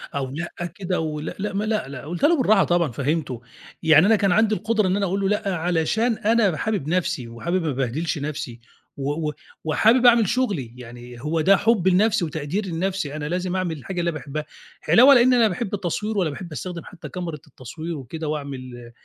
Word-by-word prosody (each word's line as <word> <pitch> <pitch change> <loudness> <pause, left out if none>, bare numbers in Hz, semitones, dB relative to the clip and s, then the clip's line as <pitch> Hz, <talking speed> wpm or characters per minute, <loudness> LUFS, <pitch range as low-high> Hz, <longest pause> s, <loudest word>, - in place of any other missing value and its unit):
أو 135 -2 -2
لأ 170 +3 -5
كده 185 -2 -2
و 155 -2 -3
لأ، 150 - -5
لأ 205 0 -3
ما 200 +2 -1
لأ، 215 -7 -1
لأ 140 -2 -7
قُلتها 175 - +1
له 340 -1 +3
بالراحة 215 -6 +4
طبعًا، 170 -6 +1
فهّمته 140 -1 -2 0.4
يعني 160 +2 +6
أنا 225 - +5
كان 200 -2 +2
عندي 215 +2 +3
القدرة 215 0 0
إن 185 - +1
أنا 200 -1 0
أقول 195 +2 -1
له 195 - +1
"لأ." 205 -3 0
علشان 175 +8 +1
أنا 210 -6 +2
حابب 205 -10 -2
نَفْسي 175 -7 -1
وحابب 170 +11 -2
ما 155 - -1
أبهدلش 135 +6 -2
نَفْسي، 140 -5 -5 0.4
و 145 +3 -2
و - - -5 0.3
وحابب 225 - +3
أعمل 235 -4 +6
شُغلي 195 - -1
يعني 120 0 -11
هو 155 +2 -1
ده 195 +4 +5
حبي 205 -4 +2
لنَفْسي 205 0 +3
وتقديري 160 +6 -3
لنَفْسي 170 -3 -2
أنا 150 0 -4
لازم 180 +1 -2
أعمل 175 -4 -2
الحاجة 180 +6 -5
اللي 170 0 0
باحبها، 150 0 -5 0.4
علاوة 265 +5 +8
لإن 250 0 +5
أنا 240 - +4
لا 220 - +6
باحب 200 +2 -4
التصوير 205 +3 -2
ولا 175 -5 +1
باحب 170 +3 -8
أستخدم 175 +2 -6
حتى 175 - -10
كاميرة 175 -4 -5
التصوير 155 +5 -7
وكده 155 +4 -6
وأعمل 130 -5 -6
175 Hz, 200 wpm, -23 LUFS, 150-205 Hz, 0.4 s, علاوة